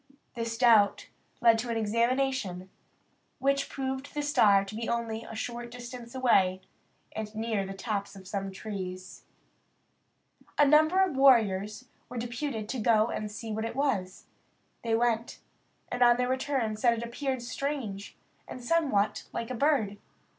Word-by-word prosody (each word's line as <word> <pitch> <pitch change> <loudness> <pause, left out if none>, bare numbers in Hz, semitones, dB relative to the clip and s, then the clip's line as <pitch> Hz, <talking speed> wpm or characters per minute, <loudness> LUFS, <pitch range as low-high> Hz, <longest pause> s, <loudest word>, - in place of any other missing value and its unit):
This 230 -1 -3
doubt 225 -5 +4 0.3
led 230 -1 +6
to 240 +2 -4
an 230 - -1
examination, 230 -4 0 0.7
which 275 +1 +1
proved 265 +1 -4
the 295 - -1
star 205 -9 +4
to 195 - -9
be 225 +1 -4
only 230 -1 -2
a 225 - -9
short 240 +1 -5
distance 240 0 -9
away, 190 -8 +3 0.5
and 215 0 -6
near 220 -3 -1
the 195 - -6
tops 200 0 -3
of 190 -1 -12
some 195 0 -3
trees. 185 -2 -7 1.3
A 295 - +6
number 310 +6 +5
of 365 -7 -1
warriors 225 -4 +3 0.2
were 250 - -7
deputed 235 -1 -3
to 260 - -2
go 220 0 +3
and 215 - -3
see 220 +1 -6
what 220 +1 -2
it 230 - -4
was. 225 -10 -1 0.6
They 225 -1 +1
went, 230 0 0 0.5
and 245 - -3
on 240 0 +6
their 250 0 0
return 260 -4 -1
said 235 +1 +3
it 230 - -4
appeared 260 +1 -3
strange, 245 -6 -4 0.3
and 250 - -8
somewhat 270 -8 +1
like 230 +1 -4
a - - -1
bird. 235 -6 +1
235 Hz, 155 wpm, -29 LUFS, 210-260 Hz, 1.3 s, led